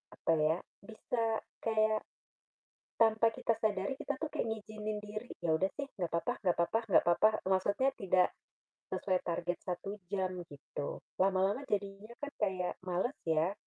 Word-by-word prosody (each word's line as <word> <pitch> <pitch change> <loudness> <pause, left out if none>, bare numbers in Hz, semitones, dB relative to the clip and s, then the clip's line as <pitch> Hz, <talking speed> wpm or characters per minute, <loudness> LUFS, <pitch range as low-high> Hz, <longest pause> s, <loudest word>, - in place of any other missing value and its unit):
apa - - 0
ya, 155 +2 +3 0.3
bisa 230 +2 -2 0.4
kayak, 215 -1 +2 1.0
tanpa 225 0 +5
kita 230 - 0
sadari 210 +4 0
kita 285 - -2
tuh 315 - -1
kayak - - -1
ngizinin 215 -1 -3
diri, 215 +3 -6 0.2
"Ya 165 - +2
udah 190 +3 +2
sih, 280 0 -4
gak 170 -2 -1
papa 245 +9 0
gak 180 -4 +2
papa 170 +6 +2
gak 185 - +6
papa," 175 +5 +6 0.2
maksudnya 200 +7 +3
tidak 185 -2 +4 0.6
sesuai 185 -2 +1
target 175 0 -1
1 195 +3 -4
jam 190 -2 0 0.2
gitu, 145 0 -5 0.2
lama-lama 195 +6 +3
jadinya 200 +2 -2
kan 290 0 -4
kayak 190 -4 0
males 185 +9 0
ya, 160 +3 +3
200 Hz, 150 wpm, -34 LUFS, 180-220 Hz, 1.0 s, gak